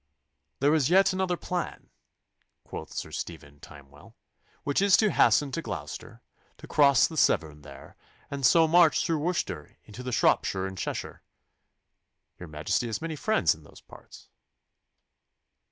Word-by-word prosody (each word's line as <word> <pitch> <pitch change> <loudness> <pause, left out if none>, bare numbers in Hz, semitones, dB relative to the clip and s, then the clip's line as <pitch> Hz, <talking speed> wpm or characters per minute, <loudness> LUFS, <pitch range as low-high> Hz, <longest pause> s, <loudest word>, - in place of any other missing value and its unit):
'There 145 +2 +4
is 150 -3 +2
yet 195 +1 +4
another 185 -2 -1
plan,' 180 0 -5 0.7
quoth - - -9
Sir - - -6
Stephen 75 -4 -8
Timewell, 70 0 -16 0.5
'which 145 +5 0
is 200 -1 +5
to 215 -3 +2
hasten 145 -2 +3
to 165 - -3
Gloucester, - - -8 0.3
to - - -12
cross 140 -3 +4
the 160 - -10
Severn 75 - +1
there, 70 -2 -13 0.4
and 140 -1 -5
so 165 +5 +5
march 170 -1 +4
through 165 -2 0
Worcestershire 175 +4 -3
into 125 +4 -8
Shropshire 95 -4 +1
and 95 0 -6
Cheshire. - - -5 1.2
Your 85 - -9
Majesty 75 +10 -2
has 110 -1 -3
many 165 -1 -5
friends 140 - +1
in 80 - -16
those 75 - -17
parts. - - -16
140 Hz, 140 wpm, -27 LUFS, -, 1.2 s, is